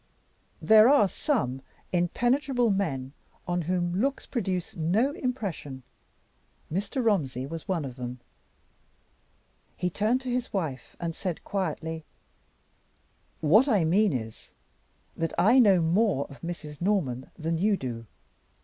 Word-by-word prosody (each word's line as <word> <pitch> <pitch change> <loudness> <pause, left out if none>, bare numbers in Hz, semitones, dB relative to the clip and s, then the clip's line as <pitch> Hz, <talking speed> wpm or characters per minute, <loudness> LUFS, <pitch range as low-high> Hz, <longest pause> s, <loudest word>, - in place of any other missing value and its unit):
There 220 +2 +7
are 280 -8 +6
some 185 - -1 0.3
impenetrable 245 - +1
men 140 -9 -2 0.3
on 175 0 0
whom 175 +2 -1
looks 275 +2 -1
produce 190 -7 -3
no 190 - +1
impression. 200 - -4 0.9
Mr. 205 +7 -2
Romsey 135 - +1
was 165 +4 -7
one 175 -6 -1
of 130 -1 -8
them. 125 0 -6 1.6
He 180 0 -1
turned 220 +7 +1
to 255 -2 -4
his 250 0 -2
wife, 155 -10 -4
and 170 -1 -3
said, 175 0 -4
quietly: 160 -4 -3 1.4
"What 205 - +5
I 210 -10 +3
mean 200 +6 +3
is, 110 -5 -6 0.6
that 165 -1 -2
I 220 +10 +5
know 195 -7 +6
more 175 -3 +2
of 140 - -13
Mrs. 155 -3 -7
Norman 160 -11 0
than 165 0 -2
you 205 +2 +2
do. 115 -5 -6
180 Hz, 125 wpm, -27 LUFS, 155-215 Hz, 1.6 s, There